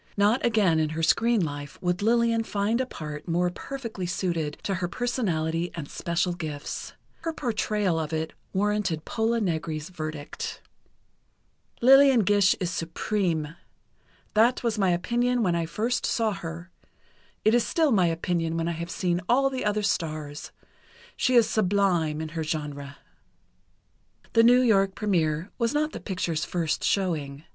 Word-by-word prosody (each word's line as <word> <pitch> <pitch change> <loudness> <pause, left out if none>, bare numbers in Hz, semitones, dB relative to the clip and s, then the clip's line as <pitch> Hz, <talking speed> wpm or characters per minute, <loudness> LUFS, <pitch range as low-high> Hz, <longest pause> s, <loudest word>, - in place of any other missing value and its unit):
Not 210 +5 +3
again 205 -9 +3
in 155 -1 +1
her 165 - -1
screen 230 +1 +3
life 145 -1 -7
would 180 +2 -1
Lillian 230 +1 +2
find 215 +3 0
a 260 - -2
part 150 -6 -7
more 175 +1 +1
perfectly 230 -5 -6
suited 170 -5 -2
to 200 - -1
her 185 -1 -1
personality 175 -6 -1
and 160 -4 -5
special 170 +3 -1
gifts. 155 -4 -6 0.2
Her 330 0 -3
portrayal 210 - -1
of 155 -1 -3
it 160 0 -2 0.2
warranted 200 -5 0
Pola 230 +1 0
Negri's 160 -5 -2
verdict: 155 -4 -6 1.2
"Lillian 270 -1 +7
Gish 205 -1 +4
is 180 -2 -1
supreme. 165 -2 -2 0.8
That 235 +4 +3
was 230 -2 0
my 190 -2 +3
opinion 240 +7 +1
when 180 -4 +2
I 165 -1 -1
first 230 +8 -1
saw 225 -2 +1
her. 175 -2 -7 0.7
It 215 - +5
is 240 -1 +4
still 320 -4 +1
my 190 -6 +4
opinion 165 0 -1
when 165 0 -1
I - - 0
have 170 +1 -5
seen 175 -1 -1
all 270 +2 +3
the 260 - -3
other 210 0 0
stars. 155 -5 -3 0.6
She 255 - +1
is 235 -3 +6
sublime 180 -7 +1
in 160 - -4
her 160 0 -3
genre." 145 -2 -4 1.4
The 230 - +6
New 245 +2 +6
York 195 -5 +3
première 170 -6 0
was 235 +4 0
not 305 +1 +1
the - - -6
picture's 175 -5 -2
first 170 -3 -1
showing. 155 -7 -1
185 Hz, 155 wpm, -26 LUFS, 160-225 Hz, 1.4 s, Lillian